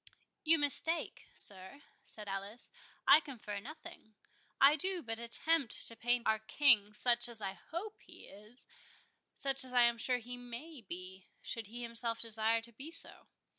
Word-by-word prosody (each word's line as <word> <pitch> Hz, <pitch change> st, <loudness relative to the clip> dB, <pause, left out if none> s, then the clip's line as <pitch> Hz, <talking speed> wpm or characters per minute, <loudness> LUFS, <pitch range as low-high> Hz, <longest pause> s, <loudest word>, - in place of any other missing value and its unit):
"You 325 Hz, +1 st, +5 dB
mistake, 305 Hz, +3 st, 0 dB
sir," 190 Hz, +8 st, -2 dB, 0.2 s
said 210 Hz, -2 st, -8 dB
Alice. 200 Hz, +4 st, -4 dB, 0.4 s
"I 280 Hz, +3 st, +8 dB
confer 230 Hz, -9 st, -8 dB
nothing. 310 Hz, -2 st, -12 dB, 0.4 s
I 280 Hz, +2 st, +6 dB
do 370 Hz, +2 st, 0 dB
but 225 Hz, -2 st, -3 dB
attempt 265 Hz, +3 st, +4 dB
to 230 Hz, -, +3 dB
paint 240 Hz, +1 st, 0 dB
our 220 Hz, 0 st, +1 dB
King 220 Hz, -3 st, +2 dB
such 240 Hz, +1 st, +4 dB
as 235 Hz, -2 st, -5 dB
I 195 Hz, -2 st, -4 dB
hope 370 Hz, -, -8 dB
he -, -, -16 dB
is—such 245 Hz, +5 st, -5 dB
as 255 Hz, -1 st, -3 dB
I 245 Hz, -1 st, +5 dB
am 235 Hz, -1 st, +2 dB
sure 250 Hz, +1 st, +1 dB
he 245 Hz, +1 st, -8 dB
may 245 Hz, +5 st, -10 dB
be, 185 Hz, -1 st, -8 dB, 0.2 s
should 225 Hz, -3 st, -6 dB
he 240 Hz, +3 st, -7 dB
himself 230 Hz, 0 st, -2 dB
desire 225 Hz, 0 st, +1 dB
to 235 Hz, +1 st, -6 dB
be 270 Hz, +8 st, -10 dB
so. 335 Hz, -, -9 dB
235 Hz, 160 wpm, -33 LUFS, 220-280 Hz, 0.4 s, I